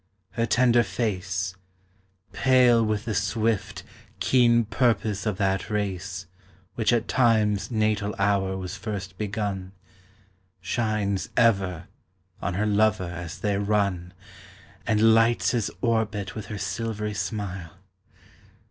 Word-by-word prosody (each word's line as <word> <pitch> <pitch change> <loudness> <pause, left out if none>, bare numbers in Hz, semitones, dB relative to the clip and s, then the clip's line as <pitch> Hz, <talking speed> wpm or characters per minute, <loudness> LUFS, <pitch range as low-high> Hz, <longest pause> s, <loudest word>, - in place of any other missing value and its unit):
Her 115 -1 -1
tender 120 -1 +4
face, 95 -5 -2 0.8
Pale 125 -3 +4
with 110 +1 -1
the 115 - -2
swift, 110 +1 -1 0.4
keen 120 -2 +4
purpose 110 -3 0
of 105 -3 -1
that 95 -1 0
race 95 -3 -3 0.5
Which 115 -1 +1
at 120 -1 +1
Time's 110 -5 +2
natal 105 -3 0
hour 100 -1 +1
was 95 0 -5
first 100 -3 -5
begun, 100 -3 -3 0.9
Shines 100 0 -1
ever 95 -7 +2 0.5
on 90 - -2
her 105 +3 0
lover 105 -4 +2
as 85 +2 -7
they 100 -2 -1
run 100 -4 -1 0.7
And 110 0 +5
lights 115 +1 +3
his 120 -4 0
orbit 110 -5 0
with 110 - -7
her 105 - -5
silvery 105 +1 -3
smile. 95 -3 -4
105 Hz, 115 wpm, -25 LUFS, 95-115 Hz, 0.9 s, And